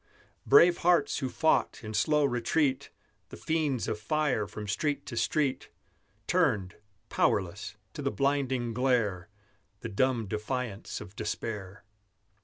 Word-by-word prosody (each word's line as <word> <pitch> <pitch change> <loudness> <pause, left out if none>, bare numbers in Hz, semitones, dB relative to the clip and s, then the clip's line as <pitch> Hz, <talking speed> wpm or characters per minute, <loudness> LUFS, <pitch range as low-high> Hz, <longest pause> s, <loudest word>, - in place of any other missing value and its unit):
Brave 175 0 +7
hearts 175 0 +3
who 130 -3 -2
fought, 160 -1 +1
in 110 0 -6
slow 150 +8 +3
retreat, 130 +2 0 0.4
The - - -10
fiends 155 -6 -1
of 105 - -2
fire 145 -3 0
from 105 0 -7
street 145 +9 -1
to 120 - -6
street, 140 +3 0 0.6
Turned, 125 - +1 0.3
powerless, 100 +1 0 0.2
to - - -6
the 140 - 0
blinding 135 -4 0
glare, 110 -7 0 0.5
The 115 - -5
dumb 120 +2 +1
defiance 110 +1 -4
of 105 -1 -11
despair. 105 -2 -5
125 Hz, 125 wpm, -29 LUFS, 105-145 Hz, 0.6 s, Brave